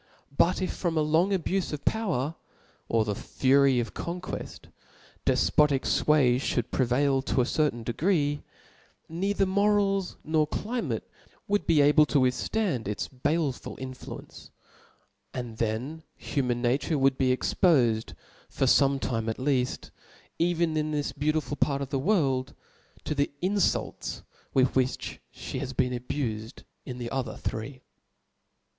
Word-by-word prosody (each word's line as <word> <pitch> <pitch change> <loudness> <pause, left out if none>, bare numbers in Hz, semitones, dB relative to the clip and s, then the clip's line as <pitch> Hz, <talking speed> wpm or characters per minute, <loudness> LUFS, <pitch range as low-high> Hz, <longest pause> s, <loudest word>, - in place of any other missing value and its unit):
But 180 +5 +3
if - - -2
from 170 -3 -2
a 155 - +3
long 160 +5 +3
abufe 195 0 0
of 145 - -6
power, 165 - 0 0.6
or 115 -1 +2
the 105 - -1
fury 135 +4 +3
of 115 - -3
conqueft, 180 +2 -6 0.6
defpotic 145 -3 +3
iway 135 -5 +3
fhotild 125 -3 -1
prevail 135 +2 +2
to 130 -1 +1
a - - +3
ceru^n 135 -3 0
degree; 145 - 0 0.7
neither 195 +4 0
lOorals 195 -1 +2
nor 155 -1 +2
climate 235 +9 -3 0.4
iM>vI<i 205 0 0
be 165 - +4
^ble 150 +1 +6
to 145 - +2
wichftand 130 - 0
its 105 0 -2
baleful 145 +1 -2
infiucnce: 130 -1 -9 0.9
aqd 120 -3 -5
(heil 120 +8 -2
human 125 -3 -2
nature 135 +6 +1
would 135 -1 +3
be 130 - +3
expofed 120 - +2 0.4
for - - 0
(omt 135 +1 +4
^me 115 -3 -2
at 110 - -3
leaft, 130 -2 -1 0.5
even 170 -1 +1
in 155 0 0
this 150 -1 -1
beautiful 150 +1 -1
part 140 -1 +1
of 135 - -6
the 135 - -1
world, 135 - +1 0.5
to - - -2
the 140 -1 +1
infults 200 +1 0 0.3
with 130 -1 +3
frliich 130 -1 -1
{he - - -6
bfp 130 -1 -5
boen 125 -1 +2
abuljid 120 -3 -4 0.2
in 125 -2 -5
the 120 -1 -5
other 130 -4 -3
three. 130 +4 -5
140 Hz, 140 wpm, -27 LUFS, 125-165 Hz, 0.9 s, ^ble